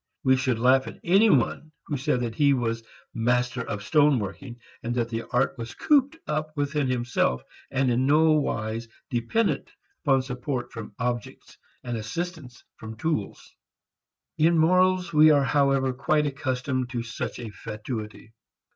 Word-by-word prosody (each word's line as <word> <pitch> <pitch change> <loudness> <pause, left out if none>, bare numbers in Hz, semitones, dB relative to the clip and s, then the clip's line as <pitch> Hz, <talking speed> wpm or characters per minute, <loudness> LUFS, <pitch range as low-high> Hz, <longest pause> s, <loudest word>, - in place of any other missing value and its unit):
We 130 -2 +5
should 130 -2 0
laugh 130 +3 +3
at - - -9
any 195 +6 +5
one 155 - +1
who 145 - -3
said 135 -2 0
that 115 -2 -2
he 140 +3 +3
was 115 -2 -2 0.3
master 125 +2 0
of 105 -3 -5
stone 145 +3 +4
working, 120 +4 -6 0.2
but 120 +1 -3
that 120 -1 0
the 115 0 -4
art 125 0 0
was 115 0 -6
cooped 290 +1 +2
up 155 0 -3
within 145 -1 0
himself 120 - 0 0.3
and 135 -1 +1
in 125 +2 +1
no 155 +2 +5
wise 115 -6 -1 0.2
dependent 125 - 0 0.3
upon 135 -4 +3
support 125 0 -4
from 110 -3 -8
objects 125 -2 -4 0.3
and 120 -2 -3
assistance 135 - -6
from 110 0 -9
tools. 155 -8 -3 0.9
In 165 +2 +4
morals 180 +1 +3
we 155 +1 +7
are 145 -2 +5
however 135 -2 +2
quite 150 +4 +1
accustomed 130 -2 -2
to 120 -3 -3
such 115 -1 -5
a 115 -3 -7
fatuity. 110 +1 -7
130 Hz, 155 wpm, -26 LUFS, 120-150 Hz, 0.9 s, we